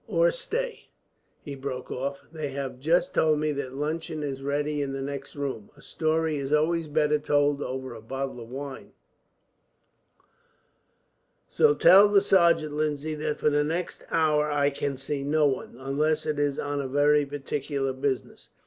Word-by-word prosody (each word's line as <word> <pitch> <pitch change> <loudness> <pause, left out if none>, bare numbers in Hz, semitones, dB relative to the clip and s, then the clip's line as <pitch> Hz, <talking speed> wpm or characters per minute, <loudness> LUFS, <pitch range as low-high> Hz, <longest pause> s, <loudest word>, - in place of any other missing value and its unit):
"Or - - +3
stay," - - -4 0.5
he 145 - -6
broke 135 -2 -6
off, 140 +2 -4
"they 155 -2 -4
have 135 -2 -5
just 165 +6 +2
told 155 -1 +3
me 150 0 0
that 135 -2 -4
luncheon 155 +2 -3
is 135 -2 -4
ready 145 +1 -1
in 135 -1 -2
the 135 - -4
next 140 0 -6
room. 135 -7 -4
A - - -16
story 160 -1 0
is 140 0 -4
always 160 +2 +2
better 150 0 +2
told 145 -1 +1
over 130 -1 -4
a 110 - -10
bottle 135 +2 -5
of 115 -1 -10
wine, 135 +1 -7 2.5
so 450 -1 +3
tell 200 +3 +8
the 205 -1 +4
sergeant, 170 -6 +3
Lindsay, 150 0 -1
that 150 0 -2
for 150 - +2
the 145 0 +2
next 165 +4 -3
hour 150 -2 +2
I 145 -1 +2
can 140 -1 -3
see 140 +1 -3
no 150 +2 +2
one, 135 -4 -1
unless 145 +4 0
it 150 -1 -1
is 145 -1 0
on 145 -2 -3
very 145 +1 +4
particular 140 -1 -3
business. 130 0 -3
145 Hz, 165 wpm, -27 LUFS, 135-155 Hz, 2.5 s, tell